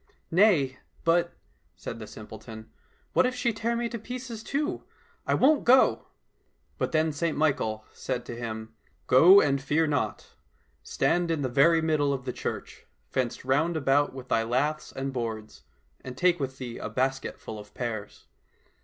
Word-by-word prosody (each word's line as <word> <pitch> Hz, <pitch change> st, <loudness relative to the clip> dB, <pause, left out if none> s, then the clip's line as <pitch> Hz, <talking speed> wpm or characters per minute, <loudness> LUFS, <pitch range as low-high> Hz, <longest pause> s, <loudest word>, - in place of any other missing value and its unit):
— -, -, -40 dB
*' -, -, -42 dB
Nay, 145 Hz, -11 st, +4 dB, 0.2 s
but," 170 Hz, +1 st, +2 dB, 0.4 s
said -, -, -7 dB
the 110 Hz, -, -8 dB
simpleton, 110 Hz, +1 st, -10 dB, 0.2 s
" -, -, -38 dB
what 260 Hz, -, +4 dB
if 255 Hz, -, -3 dB
she 235 Hz, -2 st, 0 dB
tear 230 Hz, +2 st, -1 dB
me 235 Hz, 0 st, -1 dB
to 235 Hz, -, -5 dB
pieces 245 Hz, 0 st, -7 dB
too? 295 Hz, +8 st, -2 dB, 0.4 s
I -, -, +3 dB
won't 295 Hz, +3 st, +4 dB
go! 260 Hz, +2 st, +4 dB, 0.7 s
"—But -, -, -1 dB
then 160 Hz, 0 st, +2 dB
St 160 Hz, +2 st, -1 dB
Michael 110 Hz, -8 st, 0 dB
said 125 Hz, -2 st, -4 dB
to 120 Hz, -, -6 dB
him, 110 Hz, -1 st, -6 dB, 0.2 s
'' -, -, -39 dB
Go 180 Hz, +10 st, +8 dB
and 140 Hz, -1 st, +1 dB
fear 150 Hz, +4 st, +1 dB
not! 145 Hz, -3 st, -2 dB, 0.5 s
Stand 175 Hz, -1 st, 0 dB
in 160 Hz, -3 st, 0 dB
the 130 Hz, -, 0 dB
very 160 Hz, +6 st, +4 dB
middle 150 Hz, -3 st, +2 dB
of 130 Hz, -2 st, -5 dB
the 125 Hz, -, -3 dB
church, -, -, -6 dB, 0.2 s
fenced 125 Hz, -1 st, -2 dB
round 160 Hz, +6 st, +1 dB
about 145 Hz, 0 st, +2 dB
with 130 Hz, -1 st, -9 dB
thy 115 Hz, -, +3 dB
laths 130 Hz, +7 st, -1 dB
and 135 Hz, 0 st, -4 dB
boards, 110 Hz, -3 st, -5 dB, 0.4 s
and 130 Hz, -1 st, -8 dB
take 180 Hz, +1 st, +3 dB
with 135 Hz, -1 st, -4 dB
thee 125 Hz, -3 st, -6 dB
a -, -, -4 dB
basket 130 Hz, +4 st, -2 dB
full 110 Hz, -, -7 dB
of 105 Hz, 0 st, -12 dB
pears. 110 Hz, -4 st, -5 dB
140 Hz, 180 wpm, -27 LUFS, 125-170 Hz, 0.7 s, Go